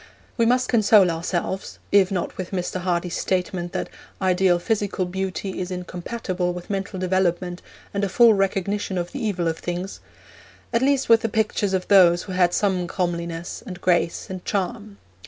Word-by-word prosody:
We 230 -1 +2
must 250 +1 +2
console 210 -5 +5
ourselves 175 +3 -3
if 195 -2 +5
not 185 -3 -2
with 185 -1 -5
Mr. 185 -1 -3
Hardy's 175 -1 -1
statement 180 -1 -1
that - - -2 0.3
'ideal 185 -1 +3
physical 205 0 -1
beauty 190 +1 -4
is 180 0 -3
incompatible 180 0 -3
with 180 +2 -7
mental 195 0 -3
development, 180 -1 0 0.3
and 200 0 -1
a 200 - +1
full 230 +4 +6
recognition 195 0 -1
of 175 0 -3
the - - -5
evil 180 -6 -1
of 165 0 -2
things' 175 +2 -4 0.7
at 230 - +2
least 270 0 +2
with 230 -1 +6
the 225 - -1
pictures 210 -2 0
of 185 - -2
those 175 -3 +6
who 195 - -8
had 180 -1 +3
some 185 -2 0
comeliness, 170 -2 -3
and 180 -2 -8
grace, 175 -2 +1
and 185 -1 -7
charm. 205 +1 -3
185 Hz, 170 wpm, -23 LUFS, 175-200 Hz, 0.7 s, full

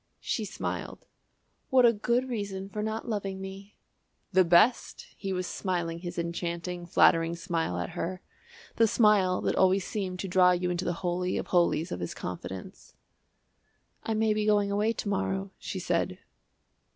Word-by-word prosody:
She 220 - -2
smiled. 200 - -5 0.6
"What 255 -2 +6
a 235 - +6
good 240 +4 0
reason 200 -5 -4
for 210 +2 -4
not 220 +2 -3
loving 195 -4 -3
me!" 195 +1 -9 0.6
"The 185 0 +6
best!" 175 +8 +3
He 195 -2 -4
was 185 -1 -1
smiling 175 -3 -2
his 175 0 -7
enchanting, 170 +1 -3
flattering 165 0 +4
smile 170 - -2
at 90 0 -3
her 185 +2 -4 0.5
the 225 - +5
smile 205 -5 +3
that - - 0
always 190 0 +3
seemed 190 -4 -3
to 195 - -4
draw 180 0 +5
you 180 0 -1
into 175 +1 -2
the 175 - 0
Holy 180 +1 0
of - - -3
Holies 175 -1 +2
of - - -3
his 85 - -4
confidence. 90 +1 -7 1.1
"I 220 - -2
may 220 0 +2
be 210 0 -1
going 205 -1 +3
away 210 +2 +2
to 230 - -5
morrow," 95 - -1
she - - -5
said. - - -1
185 Hz, 165 wpm, -28 LUFS, 170-210 Hz, 1.1 s, What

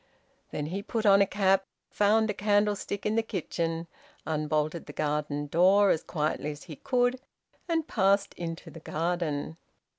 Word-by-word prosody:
Then 150 - -3
he 185 +6 -3
put 220 +1 -3
on 200 -1 +7
a 200 - +4
cap, 195 -1 +2 0.2
found 215 +1 +3
a - - -4
candlestick 205 -1 0
in 210 - +1
the 225 - +3
kitchen, 170 -5 -3 0.4
unbolted 155 +1 -1
the - - -8
garden 145 -1 -1
door 185 +6 +5
as 160 - +1
quietly 150 -2 -2
as 150 -1 -7
he 155 -5 -10
could, 245 - +1 0.5
and 325 -2 0
passed 195 +1 +2
into 165 -1 -6
the 165 - -10
garden. 160 -2 -2
180 Hz, 155 wpm, -28 LUFS, 155-205 Hz, 0.5 s, on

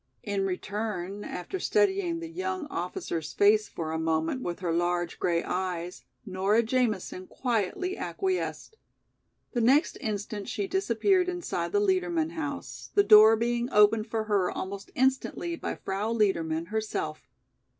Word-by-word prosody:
In 200 -2 -1
return, 200 0 -4
after 180 - -5
studying 385 -6 +1
the 335 - -5
young 370 0 -3
officer's 170 -2 -4
face 210 +1 +4
for 160 -2 -4
a 160 - -2
moment 160 +8 0
with 175 -3 -4
her 170 -3 0
large 175 0 0
grey 170 -1 +1
eyes, 180 -1 -3 0.2
Nora 195 +3 +2
Jamison 220 -6 -1
quietly 245 - -1
acquiesced. 385 +3 -3 0.8
The 240 - +1
next 270 +7 +3
instant 210 -3 -4
she 400 - -2
disappeared 375 - +2
inside 355 -1 -3
the 410 - +3
Liedermann 355 -5 +1
house, 290 -4 -5
the 405 - +6
door 215 - +8
being 235 +2 -1
opened 210 +1 +5
for 225 0 -1
her 200 -4 +1
almost 195 +1 -5
instantly 265 +6 0
by - - -4
Frau 200 +3 -3
Liedermann 170 -7 0
herself. 155 -11 -3
215 Hz, 140 wpm, -28 LUFS, -, 0.8 s, door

